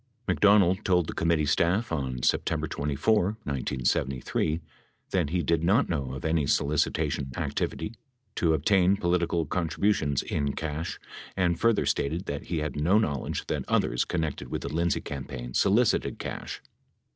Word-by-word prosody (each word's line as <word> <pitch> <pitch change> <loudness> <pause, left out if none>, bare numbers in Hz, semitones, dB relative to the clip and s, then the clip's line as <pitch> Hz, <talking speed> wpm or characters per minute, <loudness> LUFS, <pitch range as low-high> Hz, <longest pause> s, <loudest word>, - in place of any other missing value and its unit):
McDonald 100 -3 +4
told 90 -2 +3
the - - -5
committee 85 -2 +1
staff, 85 +9 +1
on 65 -3 -2
September - - +1
24, 95 +8 0
1973, 65 +3 -1 0.5
that 90 -6 +1
he 90 +1 0
did 85 -1 +1
not 100 +10 +3
know 70 -6 -2
of 65 - -7
any 80 -3 +1
solicitation 75 -1 0
activity 105 - -2 0.4
to 80 -2 +2
obtain 95 +5 +3
political 85 -2 +1
contribu 90 +6 +1
tions 70 -7 -1
in 70 -1 -1
cash 80 +1 -4 0.4
and 85 -3 +1
further 115 -2 +3
stated 80 +6 -1
that 70 -1 -4
he 85 - -2
had 75 - -3
no 85 +8 +3
knowledge 70 -11 -1
that - - -2
others - - +1
connected 80 -4 -3
with - - -4
the - - -5
Lindsay 85 0 +1
campaign - - -6
solicited 105 - +2
cash. - - -6
80 Hz, 145 wpm, -27 LUFS, 70-90 Hz, 0.5 s, McDonald